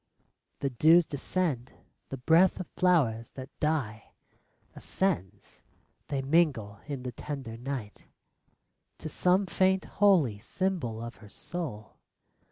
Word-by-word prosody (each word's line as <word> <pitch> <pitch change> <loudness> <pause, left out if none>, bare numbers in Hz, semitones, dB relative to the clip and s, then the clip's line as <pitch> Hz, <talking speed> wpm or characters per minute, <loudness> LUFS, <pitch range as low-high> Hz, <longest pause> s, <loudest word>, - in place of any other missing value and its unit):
The 140 - -1
dews 160 +7 +5
descend. 145 -3 -2 0.4
The 135 - -5
breath 165 +10 +4
of 185 - -4
flowers 130 -12 +2
that 130 -1 -9
die 135 -9 -2 0.6
Ascends. 105 - -3 0.5
They 135 -2 -2
mingle 135 -9 +1
in 140 -4 -5
the 125 - -4
tender 130 -2 -6
night 120 -3 -6 0.9
To - - -7
some 185 +5 +2
faint, 190 +1 +2
holy 170 - +3
symbol 125 - -2
of 115 +1 -8
her 105 - -15
soul. 130 - -6
140 Hz, 115 wpm, -29 LUFS, 115-175 Hz, 0.9 s, dews